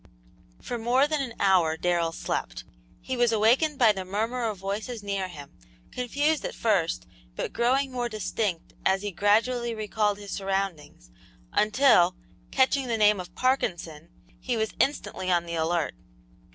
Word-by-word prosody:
For 240 - -5
more 245 +4 +3
than 300 -1 -1
an 245 -4 -5
hour 180 -5 +3
Darrell 170 -1 +1
slept. - - -4 0.4
He 260 - -3
was 240 -1 +3
awakened 245 +8 +3
by 235 -4 +6
the 190 -2 -4
murmur 225 +6 -2
of 210 - -5
voices 205 +4 -4
near 200 -2 -2
him, 145 -6 -11 0.4
confused 285 +5 0
at - - -4
first, 170 - 0 0.3
but - - -4
growing 260 +3 +1
more 245 -1 -2
distinct 210 -4 -3
as 190 +1 +2
he 205 - -3
gradually 230 +5 +1
recalled 210 -1 0
his 205 -1 -9
surroundings, 190 - -3 0.4
until, 210 -5 +4 0.3
catching 265 0 +2
the 230 -2 0
name 210 -2 +4
of 180 - -9
"Parkinson," 170 - -1 0.3
he 245 -2 -2
was 220 0 -1
instantly 190 -9 0
on 170 -1 +2
the 170 - -6
alert. 165 0 0
210 Hz, 150 wpm, -27 LUFS, 180-245 Hz, 0.4 s, by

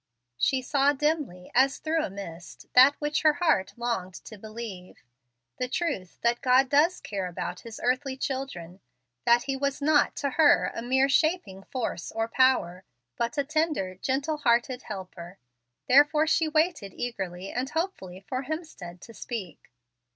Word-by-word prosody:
She 260 -1 +1
saw 280 +1 +3
dimly, 290 - -2
as 265 +3 +3
through 320 +1 0
a - - -3
mist, 175 -4 -9
that 265 +3 +7
which 295 0 -1
her 310 -1 +5
heart 305 - +1
longed 230 -7 -3
to 220 - -9
believe, 215 -3 -9 0.5
the 250 - -2
truth 255 - -3
that 235 0 +1
God 260 0 +4
does 305 +6 +3
care 195 -3 -4
about 180 0 -5
His 230 -2 -10
earthly 260 +2 0
children, 230 -11 -5 0.5
that 235 +1 +5
He 275 - -2
was 280 0 -1
not 295 0 +3
to 280 - -2
her 305 +1 +4
a - - -5
mere 265 +3 +2
shaping 280 - +1
force 245 +4 -4
or 225 0 -1
power, 230 -8 +2 0.3
but 235 - -2
a 285 - +2
tender, 305 - -1
gentle 270 - -2
hearted 250 -1 +1
helper. 185 -2 -8 0.5
Therefore 295 +4 +5
she 320 0 +2
waited 310 - 0
eagerly 190 -6 -5
and 255 +2 -2
hopefully 195 - -4
for 255 +1 -3
Hemstead 280 - -7
to 230 - -12
speak. 200 - -7
255 Hz, 155 wpm, -27 LUFS, 195-290 Hz, 0.5 s, that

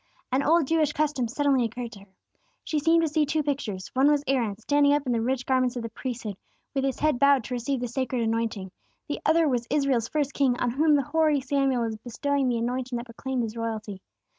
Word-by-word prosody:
An 260 +2 +2
old 320 +2 +3
Jewish 310 0 +1
custom 295 -5 0
suddenly 275 +1 +1
occurred 235 +1 -4
to 205 - -11
her. 195 - -15 0.6
She 305 - -1
seemed 330 +3 +3
to - - +2
see 305 0 +1
two 305 +1 0
pictures: 250 -10 -3
one 265 +3 +4
was 295 -1 +2
Aaron, 235 -7 0
standing 285 +5 +3
up 290 -1 0
in 250 - -1
the 230 -1 +1
rich 255 +2 -1
garments 255 -1 +1
of 240 - -4
the 230 - -4
priesthood, 225 -4 -5 0.4
with 270 -1 0
his 270 -1 -1
head 305 -5 +2
bowed 280 -2 +5
to 250 - -6
receive 250 +2 -2
the 245 - -1
sacred 250 0 -2
anointing; 225 -4 -2 0.4
the 290 - -3
other 320 0 +4
was 245 -4 -1
Israel's 275 -6 +1
first 295 -2 -1
king, 260 -3 +1
on 245 - 0
whom 300 +4 +3
the 280 - +2
hoary 305 +1 +2
Samuel 270 -2 +1
was 225 -1 -3
bestowing 265 +4 -1
the 240 - 0
anointing 250 +2 -2
that 235 - -6
proclaimed 250 +1 -3
his 225 0 -5
royalty. 220 -4 -4
260 Hz, 225 wpm, -26 LUFS, 235-290 Hz, 0.6 s, bowed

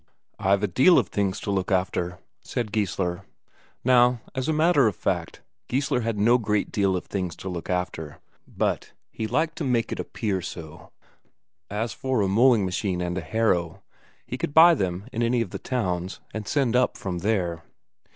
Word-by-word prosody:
"I've 100 +1 +2
a - - +3
deal 135 - +5
of - - +2
things 100 -2 -1
to 100 - -2
look 95 0 -1
after," 90 -1 0 0.3
said 115 -4 -3
Geissler. 95 -4 -1 0.6
Now, 125 -1 +4
as 130 +1 -2
a - - +4
matter 155 -4 +4
of 105 - -1
fact, - - -3 0.3
Geissler 130 -1 0
had 115 -2 -2
no 120 +4 +4
great 105 -2 0
deal 100 -2 +1
of 90 - -6
things 90 -4 -3
to 95 - -7
look 85 -2 -6
after, 90 -4 -3 0.3
but - - -2 0.2
he 110 - -3
liked 160 +6 0
to - - -2
make 125 -4 0
it - - -4
appear 100 -5 -2
so. 80 -3 -9 0.8
As 110 +3 -2
for 130 -4 -1
a 100 - +2
mowing 115 +1 +4
machine 95 0 -1
and 90 0 -2
a 95 - -2
harrow, 85 -3 0 0.4
he 125 - -5
could 145 - -3
buy 170 +2 +9
them 95 - -2
in 115 - -2
any 120 +1 +2
of 100 -6 -3
the - - -5
towns, 95 -7 -2
and 110 -2 -5
send 130 -5 +1
up 125 0 +2
from 90 -3 -4
there. 90 -4 -1
105 Hz, 185 wpm, -25 LUFS, 90-125 Hz, 0.8 s, buy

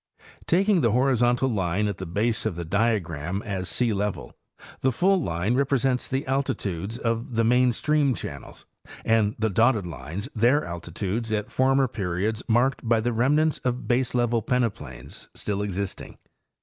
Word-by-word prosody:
Taking 190 +1 +3
the 115 -5 +2
horizontal 125 0 +2
line 100 -3 0
at 100 -2 -4
the 95 - -5
base 110 +5 0
of 100 - -3
the 85 0 -5
diagram 95 -3 -1
as 95 -4 -3
sealevel, 105 -4 -1 0.5
the 130 - +2
full 185 +9 +2
line 85 - -1
represents 135 -1 +1
the 135 +2 -2
altitude 110 -7 -2
of 115 0 -2
the 115 - +3
main 125 +2 +4
stream 145 +1 +1
channels 70 -8 -8 0.4
and 110 -2 +2
the 110 -1 0
dotted 110 0 +3
lines 85 - -6
their 120 +7 +3
altitudes 95 +6 -4
at 105 -1 -2
former 135 +1 +3
periods 105 +1 -2
marked 120 +3 +2
by 115 -1 +4
the 120 +2 -1
remnants 145 +7 +2
of 125 -1 -3
baselevel 120 -2 +1
peneplains 105 - -3
still 100 -1 -3
existing. 100 -1 -5
115 Hz, 150 wpm, -25 LUFS, 100-125 Hz, 0.5 s, main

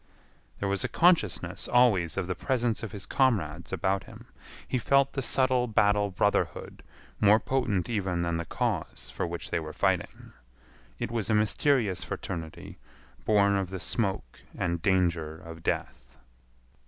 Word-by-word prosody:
There 100 - -1
was 100 -1 0
a - - 0
consciousness 165 - +2
always 105 -10 +3
of - - 0
the 90 - -2
presence 120 +3 -1
of 110 - -6
his 100 -2 -6
comrades 95 - 0
about 95 0 0
him. - - -13 0.4
He 130 - 0
felt 140 +3 +3
the 135 - -2
subtle 130 -1 +2
battle 105 -2 +2
brotherhood 90 - -1 0.4
more 105 +1 +6
potent 115 -7 -1
even 95 -6 -1
than 85 -1 -1
the 85 - -4
cause - - -3
for - - -3
which 85 0 -6
they - - +1
were 80 -1 -7
fighting. - - -1 0.6
It 105 - -4
was 115 -1 -2
a 110 - +3
mysterious 105 -3 +2
fraternity 80 -7 -6 0.5
born 100 -2 +4
of 95 -2 -1
the 95 0 -5
smoke 95 - -2 0.2
and 85 -1 -1
danger 85 -4 +1
of 80 0 -11
death. - - -4
100 Hz, 155 wpm, -28 LUFS, 85-115 Hz, 0.6 s, more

